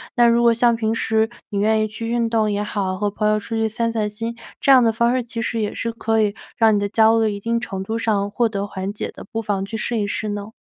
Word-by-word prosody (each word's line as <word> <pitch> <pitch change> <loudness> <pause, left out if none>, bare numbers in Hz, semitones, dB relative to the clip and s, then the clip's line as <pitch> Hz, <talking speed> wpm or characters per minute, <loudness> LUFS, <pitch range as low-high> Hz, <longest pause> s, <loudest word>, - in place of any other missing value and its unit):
那 240 -2 +5
如 235 0 +4
果 235 0 +5
像 235 0 +3
平 220 -1 -1
时， 220 -1 +1 0.2
你 200 -2 -2
愿 220 +1 +2
意 215 - 0
去 220 +2 -6
运 235 0 0
动 220 -2 +1
也 205 0 -1
好， 195 -3 -2
和 205 +1 0
朋 210 +1 -1
友 215 0 +2
出 215 +2 -5
去 225 0 +1
散 230 +1 -1
散 215 -2 0
心， 230 +2 -5 0.2
这 275 - +3
样 260 -2 +7
的 225 - +4
方 235 +2 +2
式 255 - 0
其 230 0 -5
实 225 0 -2
也 210 - -2
是 230 - -2
可 225 -1 0
以 210 0 0 0.2
让 220 -2 +5
你 - - +2
的 205 - -1
焦 225 +1 +4
虑 220 -1 +2
一 200 - -6
定 230 +3 -1
程 195 -5 -5
度 220 +4 -3
上 205 -3 0
获 230 +1 +1
得 200 -1 -3
缓 195 -1 -4
解 205 - -5
的， - - -11
不 225 - -2
妨 205 -3 -1
去 225 +3 -5
试 230 +2 -1
一 205 - 0
试 210 +1 -3
呢？ 205 +1 -5
220 Hz, 310 characters per minute, -21 LUFS, 205-230 Hz, 0.2 s, 样